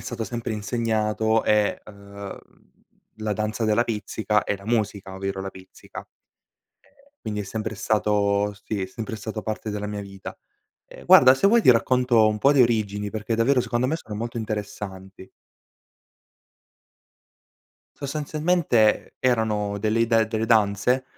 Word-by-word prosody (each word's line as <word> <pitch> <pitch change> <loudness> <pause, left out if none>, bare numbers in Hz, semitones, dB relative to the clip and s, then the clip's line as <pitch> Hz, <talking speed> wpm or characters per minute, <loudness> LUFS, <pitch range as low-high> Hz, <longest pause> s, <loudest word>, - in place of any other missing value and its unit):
stato 115 - -5
sempre 115 0 -4
insegnato, 110 0 0
e 105 -1 +2
ehm, 100 -1 -10 0.8
la 110 -1 -2
danza 110 +2 -2
della 110 +2 +2
pizzica 105 -1 -1
e - - -2
la 100 - -15
musica, 105 -4 -2
ovvero 95 0 -4
la 95 0 -5
pizzica. 95 0 -12
Ehm, - - -23 1.0
quindi 105 -1 -3
è - - -6
sempre 110 +2 -5
stato 105 -1 +1
sì, 100 -3 -3
è - - -2
sempre 110 +4 -6
stato 110 +1 -5
parte 110 0 -4
della 105 0 -4
mia 105 0 -4
vita. 100 -1 -9 0.5
Ehm, - - -13
guarda 130 0 +8
se 135 +8 +2
vuoi 230 +3 +4
ti - - +7
racconto 125 -1 +3
un 105 - -1
po' 135 +7 +4
di 140 - +4
origini 105 -4 +1
perché 110 +2 -3
davvero 125 +3 +2
secondo 120 +1 -1
me 155 +5 0
sono 110 -9 -9
molto 115 +3 -5
interessanti. 100 -3 -6 2.7
Sostanzialmente 150 -4 +1
e 130 - +3
erano 105 -4 0
delle 110 +2 0
ide 115 -1 +3
delle 110 0 -2
danze, 110 +3 +2
110 Hz, 145 wpm, -24 LUFS, 105-115 Hz, 2.7 s, guarda